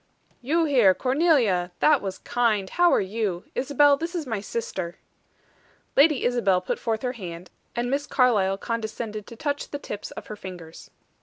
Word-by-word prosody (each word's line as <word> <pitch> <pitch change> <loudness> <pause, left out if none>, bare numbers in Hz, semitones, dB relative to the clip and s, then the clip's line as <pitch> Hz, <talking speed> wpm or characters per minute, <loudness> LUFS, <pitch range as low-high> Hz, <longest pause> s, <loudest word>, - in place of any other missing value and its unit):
"You 320 +6 +1
here, 240 -11 +5
Cornelia! 255 - +2
That 300 -3 +4
was 190 -1 -4
kind. 220 -6 0
How 350 0 +4
are - - +4
you? 195 -2 -2
Isabel, 285 +1 +4
this 335 +4 -5
is 330 -3 -2
my 225 -5 -2
sister." 190 -6 -4 1.0
Lady 290 -1 +5
Isabel 230 -7 +2
put 180 - -3
forth 225 0 -2
her 250 - 0
hand, 180 -6 -8 0.2
and 240 +1 -1
Miss 285 +1 -1
Carlyle 210 -7 +2
condescended 220 -1 -4
to 230 - -10
touch 285 +4 -3
the 285 - -4
tips 210 -7 -7
of - - -9
her 215 - -7
fingers. 180 -5 -10
230 Hz, 165 wpm, -25 LUFS, 195-280 Hz, 1.0 s, here